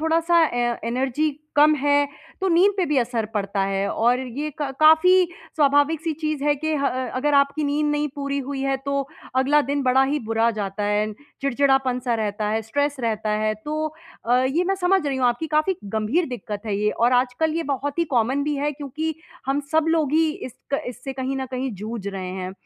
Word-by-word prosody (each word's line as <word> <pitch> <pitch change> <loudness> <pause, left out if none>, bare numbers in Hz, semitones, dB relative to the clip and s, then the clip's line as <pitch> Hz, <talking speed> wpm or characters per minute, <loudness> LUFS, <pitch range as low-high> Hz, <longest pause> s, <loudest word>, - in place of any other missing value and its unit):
थोड़ा-सा 330 +1 +3
ए 240 -2 -1
एनर्जी 265 +5 0 0.3
कम 305 +1 +6
है, 285 +1 +3 0.3
तो 380 - +1
नींद 365 +4 +4
पे 370 - +2
भी 295 - 0
असर 235 -2 -1
पड़ता 200 -1 -1
है 195 0 -1
और 240 +3 +2
ये 265 +4 -4
क 275 -2 -2
काफ़ी 360 +4 +6 0.3
स्वाभाविक-सी 295 +2 +2
चीज़ 305 -2 -2
है 295 0 +3
कि 315 +2 -1
ह 275 - +3 0.3
अगर 295 +1 +1
आपकी 280 +2 +2
नींद 295 +1 0
नहीं 295 0 0
पूरी 280 0 -2
हुई 275 -1 -3
है 270 0 +1
तो 280 0 +1 0.4
अगला 285 +3 +4
दिन 280 +1 -1
बड़ा 260 +1 +4
ही 290 +2 0
बुरा 225 +1 +2
जाता 205 -1 -4
है। 210 +1 0 0.3
चिड़चिड़ापन-सा 265 -2 +1
रहता 210 -1 -2
है, 220 +1 0
स्ट्रेस 285 +5 -1
रहता 220 -2 -1
है। 215 0 +1
तो 310 +1 -2 0.4
अ, 245 +1 +4
ये 310 +7 +1
मैं 390 +2 +1
समझ 365 -3 +2
रही 270 -2 -1
हूँ 250 - +3
आपकी 240 +7 -1
काफ़ी 310 +5 +1
गंभीर 220 - 0
दिक्कत 210 -4 -6
है 200 -2 -1
ये 210 0 +1
और 240 +2 +2
आजकल 255 +6 +1
ये 335 - 0
बहुत 285 +2 -3
ही 335 - +3
कॉमन 255 +5 +2
भी 295 -1 -1
है 290 +1 0
क्योंकि 305 +3 -4 0.3
हम 275 +2 +1
सब 320 0 +3
लोग 315 -3 +1
ही 320 0 +3 0.2
इस 250 - -9 0.2
क - - -1
इससे 260 +2 -6
कहीं 265 0 -3
न 265 - -2
कहीं 255 +1 -2
जूझ 210 0 -6
रहे 190 -2 -5
हैं। 185 0 -5
275 Hz, 205 wpm, -23 LUFS, 235-305 Hz, 0.4 s, कम